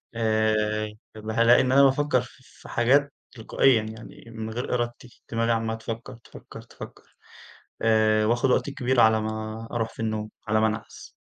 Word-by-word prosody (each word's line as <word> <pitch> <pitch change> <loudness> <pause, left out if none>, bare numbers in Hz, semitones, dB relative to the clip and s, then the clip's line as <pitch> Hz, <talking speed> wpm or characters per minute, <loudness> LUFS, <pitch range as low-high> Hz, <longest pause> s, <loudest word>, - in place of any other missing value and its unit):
آآ 110 -1 0 0.2
بابقى 110 0 -6
هالاقي 115 +1 +5
إن 130 - 0
أنا 140 +1 +6
بافكر 135 -1 +3
ف 120 - -12
في - - -17
حاجات 140 +4 +2 0.2
تلقائيًا، 120 +1 +2
يعني 110 +1 -10
من 110 -1 -6
غير 120 +3 -4
إرادتي 120 0 -4
دماغي 115 0 0
عمّالة 115 -1 -1
تفكر 115 +2 -7
تفكر 115 - -13
تفكر، - - -12 0.8
آآ 110 -1 +3
وآخد 120 +3 +1
وقت 145 - +1
كبير 130 -2 0
على 110 -1 +5
ما 110 +1 -5
أروح 115 -2 -1
في - - -10
النوم، 110 -1 -3 0.2
على 110 +1 +2
ما 110 - +3
أنعس. 110 +1 -6
115 Hz, 165 wpm, -25 LUFS, 110-120 Hz, 0.8 s, أنا